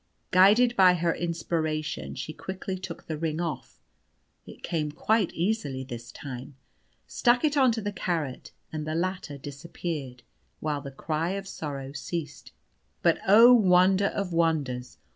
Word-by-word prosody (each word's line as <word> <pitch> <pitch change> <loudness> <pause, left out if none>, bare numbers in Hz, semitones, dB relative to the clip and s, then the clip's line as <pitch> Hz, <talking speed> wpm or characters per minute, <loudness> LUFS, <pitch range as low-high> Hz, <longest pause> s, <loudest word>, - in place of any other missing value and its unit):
Guided 215 +7 +6
by 185 -3 +6
her 170 -1 +1
inspiration 160 -2 -2
she 155 - -5
quickly 190 +3 -5
took 185 -2 -8
the 155 -2 -4
ring 160 -1 -2
off 165 -5 -5 0.7
(it - - -13
came 155 -4 -2
quite 210 +5 +1
easily 170 -8 -1
this 120 -2 -8
time), 130 0 -8 0.5
stuck 245 +3 +2
it 300 -1 +1
on 265 -3 +5
to 225 - -3
the 205 0 -3
carrot, 165 -9 -3 0.2
and 155 -1 -4
the 155 - -2
latter 180 -4 -2
disappeared, 140 -2 -6 0.4
while 150 -2 -2
the 140 - -7
cry 155 +5 -2
of 195 0 -5
sorrow 140 -7 -6
ceased. 150 0 -6 0.5
But, - - +4
oh, 230 +5 +9
wonder 190 -2 +5
of 195 -4 -3
wonders! 145 -7 0
165 Hz, 145 wpm, -27 LUFS, 145-190 Hz, 0.7 s, oh